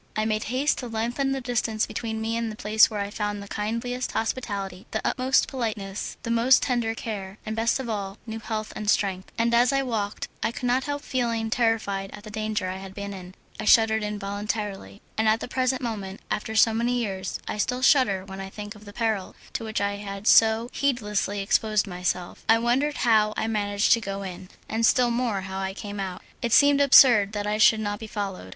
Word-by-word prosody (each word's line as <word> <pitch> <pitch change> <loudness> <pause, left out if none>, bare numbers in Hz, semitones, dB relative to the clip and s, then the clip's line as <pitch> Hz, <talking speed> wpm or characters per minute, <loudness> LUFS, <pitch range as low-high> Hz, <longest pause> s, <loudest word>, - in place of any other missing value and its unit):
I 215 - 0
made 215 -1 -1
haste 260 +5 0
to 250 - -5
lengthen 240 +4 -1
the 270 0 -2
distance 235 -3 0
between 220 -1 -4
me 225 +1 -1
and 230 -1 -2
the - - -8
place 215 +1 +4
where 210 -2 -3
I - - +1
had 200 +1 -7
found 205 -1 -3
the - - -10
kindliest 230 +5 -3
hospitality, 200 -5 -3
the 220 - -2
utmost 260 +1 +2
politeness, 215 -6 -4
the 230 - -2
most 235 +3 +5
tender 235 -4 0
care, 200 -4 -6
and 215 0 -3
best 230 +3 +1
of 260 - -4
all, 200 -3 -4
new 225 -1 -5
health 215 -1 -4
and 210 -1 -3
strength, 190 -3 0
and 235 +1 +1
as 240 +1 +5
I 275 0 +1
walked 215 -5 -3
I - - 0
could 245 - -6
not 250 +2 +1
help 290 0 -3
feeling 230 -5 -1
terrified 220 -5 0
at 205 - -10
the 215 - -9
danger 215 -2 -2
I 185 +1 -4
had 190 0 -10
been 200 0 -5
in. 185 -1 -10 0.2
I 215 - -3
shuddered 220 -1 +5
involuntarily; 205 0 -4 0.2
and 220 - +2
at 220 +1 +3
the - - -5
present 255 +1 0
moment, 200 -5 -4
after 220 +1 -2
so 220 0 +5
many 235 +2 0
years, 195 -6 -3
I 210 - -4
still 250 +4 -1
shudder 205 -10 +4
when 190 0 -8
I 195 - -6
think 205 +1 -8
of 210 -1 -15
the 205 - -11
peril 220 -5 -1 0.2
to - - -3
which 220 -2 -2
I 200 0 -1
had 200 0 -7
so 225 +1 +5
heedlessly 210 -7 0
exposed 215 +1 +2
myself. 180 -1 -3
I 225 - +7
wondered 255 +6 +1
how 215 -2 +4
I - - 0
managed 205 -2 +2
to 230 - +1
go 195 -1 -4
in, 185 -1 -8 0.2
and 225 +1 -2
still 240 +1 +4
more 235 -5 0
how 190 0 -5
I 190 0 -3
came 205 0 -6
out; 190 -2 -5 0.2
it 235 -2 0
seemed 285 0 +6
absurd 240 -7 +7
that 205 -1 -2
I 210 +1 -1
should 220 0 +6
not 205 -1 -3
be 220 - -7
followed. 195 - -5
220 Hz, 220 wpm, -25 LUFS, 200-235 Hz, 0.2 s, I